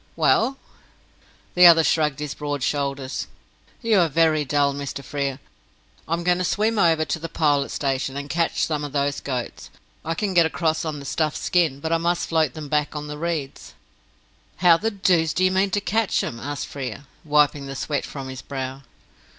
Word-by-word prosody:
"Well?" 270 +1 +2 1.0
The 180 0 +8
other 165 -1 +7
shrugged 150 -3 +1
his 150 -1 -3
broad 145 -2 -4
shoulders. 140 -2 -2 0.6
"You 225 -3 +4
are 170 -2 +3
very 155 0 +3
dull, 140 0 +1
Mr. 140 0 -5
Frere. 140 0 -3 0.7
I 160 - -1
am 170 - -5
going 180 +1 +2
to - - 0
swim 215 +4 +1
over 165 -4 +3
to 160 - -2
the 165 +1 -6
Pilot 145 -3 +1
Station, 135 -1 -2
and 140 0 -5
catch 165 +2 0
some 150 -2 -2
of 145 -1 -6
those 140 -1 0
goats. 125 -3 -5 0.3
I 165 +1 -2
can 200 +2 -2
get 170 -2 +5
across 160 -1 -1
on 155 -2 -3
the 140 - -10
stuffed 155 +2 -1
skin, 165 -7 +1
but 160 +3 -4
I 165 - +2
must 170 +1 0
float 160 -5 +1
them 155 -2 -6
back 150 +1 0
on 150 0 -4
the 150 0 -6
reeds." 160 -5 -4 0.8
"How 175 -1 +6
the 220 +7 -1
doose 180 -6 +1
do 185 - +1
you 185 - +4
mean 190 +1 +2
to 205 - 0
catch 205 +2 0
'em?" 115 - -5
asked 145 +3 -4
Frere, 135 0 -6 0.2
wiping 150 -2 +2
the 135 - -6
sweat 145 +2 -2
from 135 -2 -7
his 130 -1 -7
brow. 135 -1 -5
150 Hz, 195 wpm, -23 LUFS, 140-170 Hz, 1.0 s, The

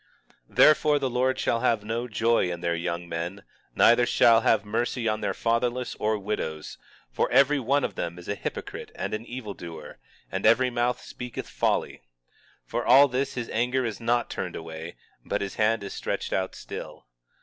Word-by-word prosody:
19:17 - - -22
Therefore 150 -1 +6
the 135 -2 -1
Lord 130 +1 +1
shall 115 - 0
have 115 -3 +1
no 115 +3 -3
joy 115 -4 +1
in 85 -1 -5
their 85 -1 0
young 85 +1 -3
men, 85 +4 -4 0.3
neither 120 +1 +5
shall 115 -1 +5
have 110 -2 +2
mercy 115 +2 -1
on 110 0 0
their - - -1
fatherless 120 +2 0
and 105 -1 0
widows; 80 -7 -4 0.3
for - - 0
every 140 +1 +4
one 135 +3 +1
of - - -2
them 85 0 -4
is 90 - -11
a - - 0
hypocrite 100 - -6
and - - -4
an 110 +2 -4
evildoer, 90 -11 -8 0.3
and 95 - -3
every 125 +3 +4
mouth 120 +1 0
speaketh 125 -1 -7
folly. - - -1 0.6
For - - -2
all 140 +3 +7
this 135 +2 -2
his 120 -2 -4
anger 125 +3 +1
is 110 -3 -4
not 120 +1 +1
turned - - -4
away, 80 +1 -7 0.3
but - - -2
his 100 -1 -3
hand 110 0 +2
is 100 - -6
stretched - - -3
out 95 0 -1
still. - - -8
115 Hz, 185 wpm, -26 LUFS, 95-125 Hz, 0.6 s, all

